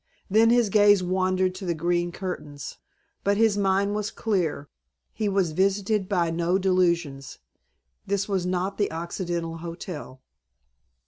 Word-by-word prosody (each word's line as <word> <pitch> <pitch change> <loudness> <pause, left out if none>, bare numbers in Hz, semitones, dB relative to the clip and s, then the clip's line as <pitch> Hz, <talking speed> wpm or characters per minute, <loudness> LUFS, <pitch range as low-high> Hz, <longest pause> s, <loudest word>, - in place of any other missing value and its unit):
Then 225 +3 +5
his 240 -2 +4
gaze 205 -2 +5
wandered 185 0 +1
to 190 +1 -7
the 170 - 0
green 175 +2 0
curtains. 150 -7 -6 0.4
But 200 0 +2
his 220 -2 +4
mind 200 0 +1
was 210 -1 -2
clear. 180 -11 -1 0.5
He 215 -2 -1
was 190 -4 +1
visited 195 +3 +1
by 175 -5 +1
no 170 +2 +1
delusions. 170 -7 0 0.7
This 200 -1 0
was 195 -3 0
not 185 +2 -2
the 205 - +1
Occidental 170 0 -4
Hotel. 165 -5 -7
185 Hz, 135 wpm, -25 LUFS, 170-200 Hz, 0.7 s, Then